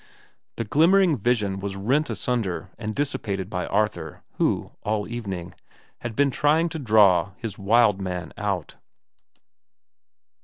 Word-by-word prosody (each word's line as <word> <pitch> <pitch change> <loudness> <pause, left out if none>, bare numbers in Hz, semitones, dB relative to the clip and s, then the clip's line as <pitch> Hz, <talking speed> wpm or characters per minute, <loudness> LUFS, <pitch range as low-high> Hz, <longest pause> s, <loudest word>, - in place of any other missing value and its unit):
The 115 - -1
glimmering 170 - +4
vision 105 -4 0
was 100 0 -4
rent 130 +10 +1
asunder 100 -7 -2
and 110 -2 -4
dissipated 105 -9 -2
by 90 -2 -2
Arthur, 105 +1 -1
who, - - 0
all 105 -1 -1
evening, 100 -7 -5 0.5
had 120 -2 -5
been 140 +1 +3
trying 155 +5 +2
to 160 - -5
draw 105 -6 +4
his 110 -5 -6
wild 105 0 +3
man 90 -2 -4
out. 100 -6 -3
105 Hz, 125 wpm, -24 LUFS, 95-125 Hz, 0.5 s, glimmering